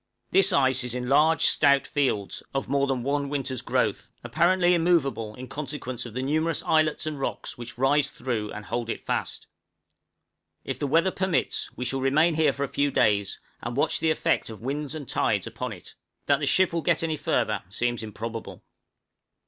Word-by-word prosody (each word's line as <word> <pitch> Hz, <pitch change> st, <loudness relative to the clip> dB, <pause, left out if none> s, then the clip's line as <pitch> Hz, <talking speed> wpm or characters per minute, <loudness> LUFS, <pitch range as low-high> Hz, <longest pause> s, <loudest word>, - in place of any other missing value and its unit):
This 195 Hz, +1 st, +5 dB
ice 130 Hz, -4 st, +2 dB
is 125 Hz, -1 st, -4 dB
in 125 Hz, 0 st, -3 dB
large 155 Hz, +3 st, +4 dB
stout 140 Hz, -1 st, +4 dB
fields, 130 Hz, -9 st, -1 dB
of 135 Hz, -, -1 dB
more 140 Hz, 0 st, +1 dB
than 130 Hz, -3 st, -1 dB
one 140 Hz, +1 st, -1 dB
winter's 135 Hz, -3 st, -2 dB
growth, -, -, -1 dB
apparently 175 Hz, +2 st, +3 dB
immovable 150 Hz, -11 st, +1 dB
in 130 Hz, +1 st, -8 dB
consequence 135 Hz, -4 st, -5 dB
of 115 Hz, -, -12 dB
the 130 Hz, -, -2 dB
numerous 155 Hz, +3 st, 0 dB
islets 155 Hz, -1 st, +2 dB
and 155 Hz, -2 st, -4 dB
rocks 135 Hz, -, -4 dB
which 120 Hz, 0 st, -9 dB
rise 135 Hz, +3 st, +2 dB
through 110 Hz, -5 st, -3 dB
and 105 Hz, -, -7 dB
hold 115 Hz, +4 st, -3 dB
it -, -, -2 dB
fast. -, -, -3 dB, 1.2 s
If -, -, -4 dB
the 145 Hz, -, -1 dB
weather 165 Hz, +6 st, +3 dB
permits, 190 Hz, -2 st, -1 dB
we 125 Hz, -, -3 dB
shall 135 Hz, +2 st, -1 dB
remain 155 Hz, +6 st, +3 dB
here 160 Hz, 0 st, +3 dB
for 140 Hz, -, -4 dB
a -, -, -1 dB
few 145 Hz, +1 st, +1 dB
days 100 Hz, -6 st, +1 dB, 0.2 s
and 120 Hz, +1 st, -5 dB
watch -, -, +1 dB
the 160 Hz, -, +1 dB
effect 155 Hz, -, +1 dB
of 110 Hz, -, -9 dB
winds 145 Hz, +3 st, -3 dB
and 145 Hz, -4 st, -7 dB
tides -, -, 0 dB
upon -, -, -5 dB
it; -, -, -10 dB, 0.3 s
that -, -, +3 dB
the -, -, -1 dB
ship 185 Hz, -2 st, +3 dB
will 170 Hz, -, 0 dB
get 170 Hz, 0 st, +1 dB
any 160 Hz, -1 st, 0 dB
further 145 Hz, -, 0 dB
seems 120 Hz, +3 st, -1 dB
improbable. 110 Hz, +1 st, -7 dB
140 Hz, 190 wpm, -26 LUFS, 125-155 Hz, 1.2 s, This